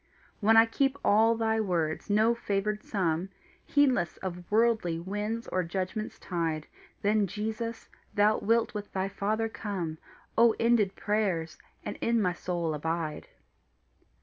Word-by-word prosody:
When 225 +1 +5
I 225 - +9
keep 270 +4 0
ALL 225 +3 +5
thy 225 -1 +1
words, 170 -3 -1
no 215 +3 +4
favoured 210 -2 -1
some 180 -3 -1 0.4
Heedless 265 -11 +2
of 180 -2 -6
worldly 220 -6 +2
winds 210 +6 -3
or 185 - +1
judgment's 190 +5 -3
tide, 165 -4 -2 0.4
Then, 205 0 +3
Jesus, 220 +4 -4 0.3
thou 210 +1 +4
wilt 230 +2 +2
with 205 -1 -6
thy 190 0 -1
Father 215 +3 -1
come 185 -8 -4 0.4
O 230 -1 +6
ended 225 -5 +3
prayers! 190 -7 -1 0.3
and - - -4
in 235 0 +2
my 180 -4 +1
soul 175 -2 -2
abide. 160 0 -3
205 Hz, 135 wpm, -29 LUFS, 175-225 Hz, 0.4 s, I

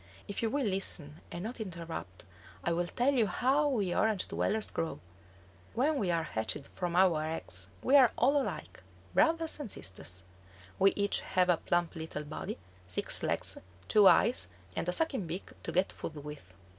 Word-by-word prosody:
If 200 - -4
you 225 - +1
will 280 +2 0
listen 175 -6 +1
and 175 - -5
not 230 +2 -5
interrupt, 165 - -7 0.4
I 170 - +1
will 175 +1 0
tell 250 +9 +1
you 235 -5 +3
how 265 +10 +2
we 205 -10 0
Orange 215 -3 +1
dwellers 215 +1 0
grow. 165 - -3 0.8
When 280 +4 +2
we 190 - 0
are 165 -1 +1
hatched 135 +1 -3
from 175 -1 -3
our 175 -4 +4
eggs 95 - -3
we 270 - +4
are 260 -5 +8
all 285 +1 +4
alike, - - -6 0.3
brothers 325 +1 +2
and 285 -7 -5
sisters. 95 - -5 0.6
We 195 +1 +6
each 200 0 +2
have 185 -1 +1
a 175 - +5
plump 175 +1 0
little 160 -2 -5
body, 150 +1 -5 0.3
six 90 - 0
legs, - - 0 0.3
two 210 -2 +6
eyes, 220 - +5 0.3
and 180 - -1
a - - +3
sucking 265 - 0
beak 175 +4 -5
to - - -4
get 185 +2 +2
food 160 - -7
with. 150 -9 -9
185 Hz, 175 wpm, -32 LUFS, 160-235 Hz, 0.8 s, are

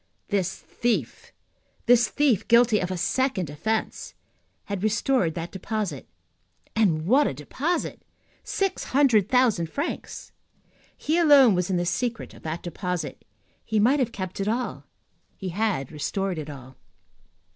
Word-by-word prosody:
This 190 -3 0
thief, 240 -1 -3 0.5
this 240 -2 +5
thief 275 -7 +1
guilty 235 -2 +5
of 180 - -2
a 185 - -3
second 190 - 0
offence, 220 +9 -3 0.5
had 200 -2 -4
restored 215 -4 +1
that 170 0 -5
deposit. 190 - -4 0.7
And 170 -8 +2
what 265 +10 +4
a - - -3
deposit! 280 - -3 0.4
Six 390 -1 -2
hundred 250 -8 +3
thousand 240 -10 +3
francs. 285 - -5 0.7
He 320 +3 0
alone 285 -8 +7
was 180 0 0
in 185 - +1
the 175 - 0
secret 225 +7 -2
of - - -15
that 160 +2 -5
deposit. 180 0 -4 0.4
He 220 -1 0
might 255 +8 +4
have 245 -3 0
kept 185 -3 -6
it 195 - -1
all, 240 +3 -2 0.5
he 190 - -5
had 180 - -1
restored 180 +4 -2
it 155 0 -6
all. 130 -2 -11
205 Hz, 140 wpm, -25 LUFS, 175-245 Hz, 0.7 s, alone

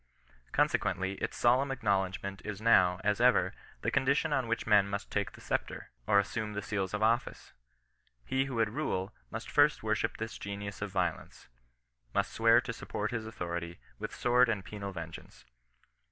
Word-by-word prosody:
Conse - - +3
quently 95 +2 -2
its - - -3
solemn 130 +3 +3
acknowledgment 100 -5 -1
is 105 -2 -5
now, 95 -5 +4
as 105 +2 +1
ever, 120 -7 +4 0.3
the - - +1
condition 140 +3 +2
on 130 -4 +1
which 115 0 -1
men 105 -2 +5
must 100 +1 -4
take 100 -1 -1
the - - -14
sceptre, - - -3 0.2
or 100 - +5
assume 105 +2 0
the 105 0 -4
seals 100 -2 -2
of 105 - -1
office. 115 +2 0 0.7
He 130 - +1
who 135 -2 -5
would 115 -2 +2
rule, 105 -9 -2 0.2
must - - -6
first - - +4
wor - - +1
ship - - -1
this 110 0 -5
genius 100 0 -6
of 100 - -2
violence 90 -4 -3 0.3
— - - -42
must - - +1
swear 115 +1 +5
to 120 -3 -5
support 105 -1 -4
his 115 -2 -3
authority 85 -5 -4 0.2
with - - -5
sword 125 0 +4
and 100 -4 -1
penal 100 0 -6
vengeance. 80 -8 -9
105 Hz, 180 wpm, -31 LUFS, 95-115 Hz, 0.7 s, men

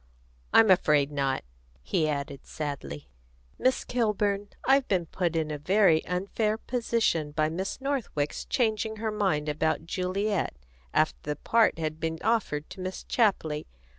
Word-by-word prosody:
"I'm 225 -3 +7
afraid 150 -6 +4
not," 135 -2 0 0.4
he 155 - +1
added 140 -1 -4
sadly. 140 - -5 0.5
"Miss 255 0 +2
Kilburn, 205 -4 0 0.2
I've 270 0 +4
been 180 -4 +1
put 170 0 -2
in 155 -1 0
a 150 - -4
very 180 -1 +4
unfair 200 +4 0
position 230 -10 0
by 155 0 +1
Miss 185 - -3
Northwick's 265 - -2
changing 220 -2 0
her 220 0 -2
mind 190 -8 0
about 155 +1 0
Juliet, 190 - -1 0.4
after 155 - +2
the 150 0 -3
part 230 +7 +3
had 155 -1 -3
been 160 0 -2
offered 195 -10 0
to - - -9
Miss 185 0 -5
Chapley. 175 -10 +1
180 Hz, 140 wpm, -28 LUFS, 155-215 Hz, 0.5 s, I'm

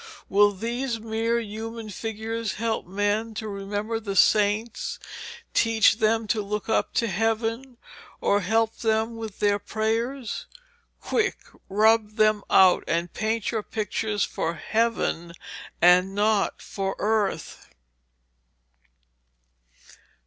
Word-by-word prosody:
Will 205 +1 +5
these 235 +4 -3
mere 225 +1 0
human 225 0 -6
figures 225 +1 -4
help 225 -3 -2
men 205 +4 -1
to 220 - -4
remember 205 +2 -3
the 200 -3 -5
saints, 210 +3 +2 0.6
teach 225 -1 +4
them 225 0 +2
to 215 0 0
look 210 +1 -4
up 220 - 0
to 230 - +2
heaven, 225 +5 -1 0.4
or 200 - +2
help 225 +3 +1
them 225 0 0
with 220 -3 -7
their 205 0 +2
prayers? 225 +4 -2 0.5
Quick, 445 - 0 0.3
rub 215 +1 +3
them 215 -1 +3
out, 185 -1 +6
and 170 +1 -1
paint 220 0 -1
your 225 -2 -1
pictures 210 0 -2
for 165 +1 -2
heaven 210 -4 -1 0.5
and 180 +2 +5
not 210 0 +1
for 195 -1 -3
earth.' 210 -2 -1
220 Hz, 115 wpm, -25 LUFS, 205-225 Hz, 0.6 s, out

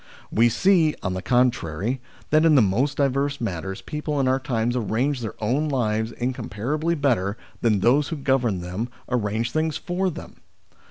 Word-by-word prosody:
We 115 +2 +4
see, 170 - +3
on 95 - -1
the 95 - -3
contrary, 120 - +1 0.3
that 155 +1 +5
in 160 -2 +5
the 135 - +7
most 125 +9 +1
diverse 140 0 +1
matters 95 -4 -4
people 150 -1 -3
in 135 - +2
our 130 +1 +2
times 120 -3 -1
arrange 125 +4 0
their 110 - -5
own 135 +8 0
lives 110 -4 0
incomparably 130 +6 -2
better 115 - +1 0.2
than 110 -4 +2
those 135 +6 +4
who 165 - -3
govern 130 - +1
them 90 +7 -4 0.2
arrange 115 -1 -1
things 155 -1 0
for 185 0 -1
them. 170 - -9
125 Hz, 165 wpm, -24 LUFS, 110-145 Hz, 0.3 s, the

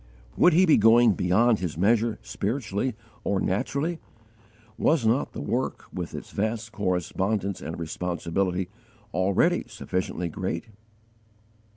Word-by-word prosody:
Would 175 - +5
he 180 +4 +6
be 160 - +6
going 115 +2 +6
'beyond 105 +6 +3
his 85 -4 -3
measure,' 110 +4 +2
spiritually, 110 +1 -2 0.3
or 100 - 0
naturally? 140 - -1 0.8
Was 150 -2 +2
not 115 +5 +1
the - - -5
work, - - -2
with - - -5
its - - -8
vast 110 +1 -2
correspondence 100 0 -1
and 80 - -5
responsibility, 90 +2 -2 0.5
already 100 - +2
sufficiently 95 -5 -3
great? 90 +4 -4
105 Hz, 115 wpm, -26 LUFS, 90-120 Hz, 0.8 s, he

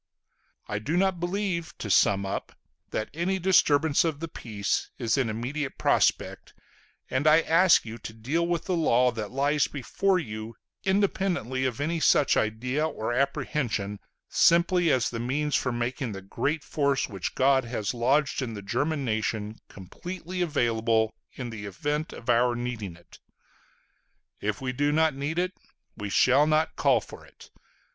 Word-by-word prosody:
I 105 - -2
do 150 +10 -1
not 190 -1 +2
believe 175 -1 -2
to 105 - -4
sum 100 +1 +4
up 95 - -4 0.4
that 110 - -3
any 175 +4 0
disturbance 160 -5 +3
of 160 -4 -1
the 165 - -4
peace 105 -9 -3
is 115 -3 0
in 130 -4 +1
immediate 130 +6 -4
prospect; - - +1 0.6
and 130 +4 +1
I 155 +2 +7
ask 170 0 +4
you 115 +1 -7
to 110 - -7
deal 135 +10 -1
with 170 -1 -1
the 185 - 0
law 125 -6 +3
that 110 -3 -5
lies 140 +2 +1
before 185 +7 0
you, 110 -7 -6 0.3
independently 190 - 0
of 125 -1 -2
any 165 +3 -1
such 150 - +4
idea 125 +8 0
or 115 -6 -3
apprehension, 130 -6 -1 0.3
simply 170 +1 +4
as 125 -2 +1
a 115 - -3
means 145 +5 -1
for 125 - +1
making 120 0 -3
the 95 -1 -8
great 145 +10 -2
force 140 -3 0
which 95 -3 -5
God 135 0 +4
has 110 -3 -3
lodged 135 +5 +1
in 115 -4 -4
the 100 - -7
German 140 +8 -1
nation 110 -1 -2
completely 180 - -7
available 115 -8 +1 0.2
in 120 -2 -6
the 105 -2 -7
event 145 - -3
of 115 - -11
our 120 0 +3
needing 120 -7 -4
it. 85 +1 -18 1.2
If 105 +2 -2
we 130 -1 -2
do 145 +3 +1
not 160 0 +3
need 140 +4 -3
it, 180 +1 0 0.4
we 105 -2 -5
shall 130 +8 +4
not 155 +1 +1
call - - +3
for - - -12
it. - - -17
135 Hz, 160 wpm, -27 LUFS, 115-160 Hz, 1.2 s, I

